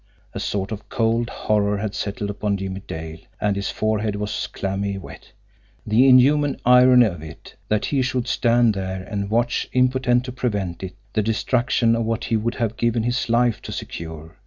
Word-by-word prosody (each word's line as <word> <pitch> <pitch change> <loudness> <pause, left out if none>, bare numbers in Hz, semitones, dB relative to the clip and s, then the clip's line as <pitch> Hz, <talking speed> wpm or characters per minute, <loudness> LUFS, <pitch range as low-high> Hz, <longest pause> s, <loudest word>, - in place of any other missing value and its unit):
A - - -4
sort 100 +1 -2
of 110 0 -7
cold 115 +1 0
horror 105 -1 0
had 100 0 -3
settled 100 0 -3
upon 105 0 -1
Jimmie 95 0 -5
Dale, 80 0 -6 0.2
and 105 -1 +1
his 100 0 -2
forehead 110 -1 -1
was 105 0 -3
clammy 100 0 -3
wet. 95 - -11 0.5
The 115 +5 +4
inhuman 140 +3 +4
irony 125 0 +7
of 85 -7 -3
it! 80 +1 -11
That 105 0 0
he 140 -2 0
should 130 -1 -1
stand 120 -1 +3
there 95 -1 -4
and 100 0 -4
watch, 120 +2 0
impotent 125 -1 +2
to 125 - -5
prevent 105 -8 -3
it, 95 -1 -6 0.2
the 110 - +2
destruction 115 +2 +1
of 115 - 0
what 115 +1 -2
he 115 - -1
would 115 +2 -1
have 115 -2 -2
given 115 -1 +1
his 120 0 -1
life 120 -2 +2
to - - -8
secure! 80 -1 -7
110 Hz, 180 wpm, -22 LUFS, 100-120 Hz, 0.5 s, irony